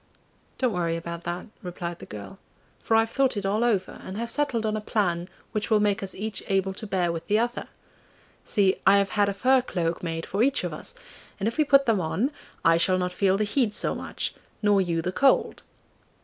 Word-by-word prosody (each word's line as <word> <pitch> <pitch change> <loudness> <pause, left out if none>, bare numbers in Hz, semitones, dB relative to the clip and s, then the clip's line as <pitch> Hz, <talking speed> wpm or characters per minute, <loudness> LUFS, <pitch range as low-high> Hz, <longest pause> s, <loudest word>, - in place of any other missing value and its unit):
'Don't 255 -4 +1
worry 170 -2 0
about 170 0 -6
that,' 175 +1 -3 0.2
replied 175 -2 -5
the - - -10
girl, 100 -2 -9 0.4
'for 225 - +1
I've 225 0 +3
thought 265 -4 +1
it 200 - -2
all 210 +4 +1
over, 205 -6 0
and 190 - -6
have 235 +1 -3
settled 265 -7 0
on 215 0 0
a 215 - -2
plan 180 -5 -1 0.2
which 210 -2 -2
will 215 -2 +4
make 205 0 +1
us 195 -1 -5
each 215 +1 -4
able 195 0 +1
to 215 +3 -7
bear 180 -3 +1
with 165 0 -6
the 210 - +3
other! 240 +2 -1 0.8
See, 195 -2 +2
I 200 +1 +8
have 200 -1 +1
had 205 -1 +2
a - - -1
fur 260 +6 +4
cloak 170 -8 -2
made 165 -1 -3
for 200 - -2
each 275 +3 +2
of - - -3
us, - - -6 0.4
and 200 - 0
if 230 +7 -3
we - - +6
put 275 -1 +5
them 220 -6 +2
on 210 - 0 0.3
I 165 0 +6
shall 185 +2 +3
not 180 0 -1
feel 190 0 +2
the 215 - +1
heat 210 0 +1
so - - 0
much - - -3 0.3
nor 205 -1 +4
you 170 -3 -1
the 180 - -1
cold. 265 +9 +2
200 Hz, 220 wpm, -26 LUFS, 180-225 Hz, 0.8 s, I